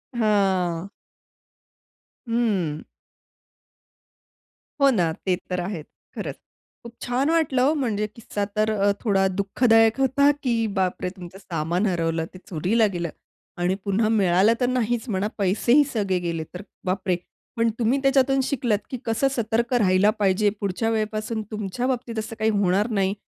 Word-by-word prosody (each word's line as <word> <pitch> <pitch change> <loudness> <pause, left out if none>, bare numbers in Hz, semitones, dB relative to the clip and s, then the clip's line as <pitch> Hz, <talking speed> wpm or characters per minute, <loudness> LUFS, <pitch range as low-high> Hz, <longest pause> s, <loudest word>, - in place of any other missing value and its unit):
हां. 195 -5 +1 1.4
हं. 205 -10 0 2.0
हो 275 - +7
ना, 175 -9 +1
ते 185 -2 +2
तर 180 - -1
आहेच. 175 -3 -4 0.3
खरंच - - -4 0.5
खूप 235 0 -10
छान 255 +4 0
वाटलं 315 -6 +2
हो 300 - +3
म्हणजे 215 -3 -1
किस्सा 215 -3 -4
तर 215 +1 +2 0.3
थोडा 195 -4 +2
अ, - - +4
दुःखदायक 225 +3 +3
होता, 270 +2 +4
की 245 -3 +1 0.2
बापरे! 185 -1 -1
तुमचं 180 0 -10
सामान 175 +2 -2
हरवलं 165 -2 0
ते 185 - -10
चोरीला 200 +7 +2
गेलं 170 -1 -2 0.5
आणि 180 +2 +1
पुन्हा 215 +2 +1
मिळालं 190 +3 +4
तर 245 - +2
नाहीचं 240 -1 -1
म्हणा 195 +2 0
पैसेही 215 +8 +3
सगळे 195 -5 0
गेले 165 -1 -2
तर 180 - -6 0.2
बापरे! 185 0 0 0.4
पण 230 -1 +2
तुम्ही 240 +3 +2
त्याच्यातून 270 0 +3
शिकलात, 245 -6 0
की 255 - -4
कसं 225 +4 +1
सतर्क 235 +1 0
राहायला 195 -3 +4
पाहिजे 200 +1 +3
पुढच्या 200 +3 -1
वेळेपासून 215 0 -2
तुमच्या 215 +4 -3
बाबतीत 240 -3 -2
असं 225 +1 -5
काही 220 0 +2
होणार 200 +3 +2
नाही, 195 0 +2
215 Hz, 140 wpm, -24 LUFS, 185-235 Hz, 2.0 s, हो